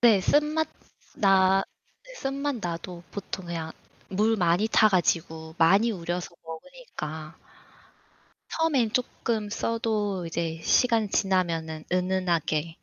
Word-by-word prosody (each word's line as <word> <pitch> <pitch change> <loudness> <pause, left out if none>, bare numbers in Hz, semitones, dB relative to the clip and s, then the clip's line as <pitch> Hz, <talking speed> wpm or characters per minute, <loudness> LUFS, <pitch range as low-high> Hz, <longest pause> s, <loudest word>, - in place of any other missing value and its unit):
네. 225 -5 +6
쓴맛 300 +8 +2 0.5
나 195 -1 +5 0.4
네 - - -13
쓴맛 275 - -2
나도 170 0 -5
보통 190 -2 -6
그냥 165 -2 -4 0.4
물 215 +3 +2
많이 180 +4 +2
타 215 - +5
가지고 160 -4 0
많이 195 +8 +5
우려서 175 -2 -4
먹으니까. 160 - -8 1.1
처음엔 285 -9 +1
쪼끔 230 -3 -1
써도 210 -4 -1
이제 165 0 -3
시간 230 0 +3
지나면은 165 -6 0
은은하게 180 -4 0
190 Hz, 225 characters per minute, -27 LUFS, 170-225 Hz, 1.1 s, 네